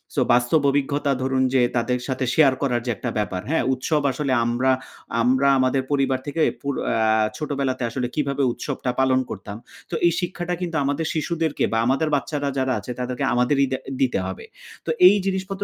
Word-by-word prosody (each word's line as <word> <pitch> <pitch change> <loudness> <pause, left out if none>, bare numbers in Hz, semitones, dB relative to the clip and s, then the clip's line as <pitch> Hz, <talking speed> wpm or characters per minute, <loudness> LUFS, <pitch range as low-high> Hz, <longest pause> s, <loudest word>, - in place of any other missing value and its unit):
So - - +2
বাস্তব 125 +5 +3
অভিজ্ঞতা 140 0 0
ধরুন, 130 0 +1
যে 130 - +4
তাদের 125 +1 0
সাথে 130 0 -1
শেয়ার 140 -4 +5
করার 125 -4 0
যে 120 - 0
একটা 120 - -3
ব্যাপার, 100 -3 -2
হ্যাঁ? 160 - +1
উৎসব 150 +4 0
আসলে 140 +1 -2
আমরা, 125 +3 +1 0.5
আমরা 130 +3 +3
আমাদের 130 +1 +2
পরিবার 135 -2 +1
থেকে 160 +3 -2 0.2
পুর 140 0 -2 0.2
আ - - 0 0.4
ছোটবেলাতে 135 -4 -2
আসলে 125 +1 -2
কিভাবে 140 -2 0
উৎসবটা 130 0 -3
পালন 130 -1 +3
করতাম। 100 +1 -7 0.3
তো 170 - -3
এই 170 - +5
শিক্ষাটা 175 0 -3
কিন্তু 170 -2 -3
আমাদের 145 +3 -1
শিশুদেরকে 160 0 -1
বা - - +2
আমাদের 135 +5 +1
বাচ্চারা 145 0 -2
যারা 130 -1 +1
আছে, 105 - -7
তাদেরকে 125 +2 -3
আমাদেরই 135 +3 +2
দে 130 - 0 0.2
দিতে 125 -6 +2
হবে। 95 - -7 0.4
তো - - -5 0.2
এই 200 - +6
জিনিসপত্র 195 +1 -2
135 Hz, 180 wpm, -23 LUFS, 125-150 Hz, 0.5 s, এই